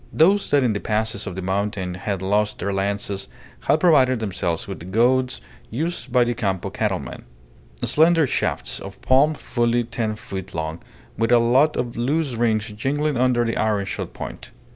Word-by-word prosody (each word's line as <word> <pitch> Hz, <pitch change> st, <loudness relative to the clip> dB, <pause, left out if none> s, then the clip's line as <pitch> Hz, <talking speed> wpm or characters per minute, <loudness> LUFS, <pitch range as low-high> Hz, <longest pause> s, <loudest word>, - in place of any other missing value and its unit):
Those 195 Hz, +6 st, +3 dB
that 145 Hz, -2 st, +4 dB
in 120 Hz, -4 st, +2 dB
the 105 Hz, -, -2 dB
passes 110 Hz, -1 st, -1 dB
of 90 Hz, -, -5 dB
the 95 Hz, -, -5 dB
mountain 95 Hz, -1 st, -2 dB
had 95 Hz, +1 st, -3 dB
lost 105 Hz, +2 st, +1 dB
their 100 Hz, -, -2 dB
lances 100 Hz, 0 st, -2 dB, 0.3 s
had 150 Hz, +3 st, +2 dB
provided 135 Hz, -8 st, +4 dB
themselves 90 Hz, -6 st, -2 dB
with 95 Hz, -4 st, -6 dB
the 85 Hz, -, -10 dB
goads 125 Hz, +5 st, +2 dB, 0.3 s
used 145 Hz, 0 st, -3 dB
by 125 Hz, 0 st, +5 dB
the 120 Hz, 0 st, 0 dB
Campo 95 Hz, -6 st, -2 dB
cattlemen: -, -, -3 dB, 0.6 s
slender 165 Hz, 0 st, +4 dB
shafts -, -, -1 dB
of -, -, -9 dB
palm 140 Hz, +4 st, +4 dB
fully 120 Hz, -3 st, 0 dB
ten 110 Hz, -2 st, -3 dB
feet 95 Hz, -4 st, -7 dB
long, 80 Hz, +1 st, -3 dB, 0.4 s
with 115 Hz, +1 st, +1 dB
a 120 Hz, -, +7 dB
lot 125 Hz, +6 st, +3 dB
of 120 Hz, -2 st, -3 dB
loose 140 Hz, +3 st, 0 dB
rings 110 Hz, -2 st, 0 dB
jingling 140 Hz, +8 st, -1 dB
under 125 Hz, -1 st, +2 dB
the 115 Hz, -, -1 dB
ironshod 105 Hz, -3 st, -1 dB
point. -, -, -8 dB
115 Hz, 170 wpm, -22 LUFS, 100-130 Hz, 0.6 s, a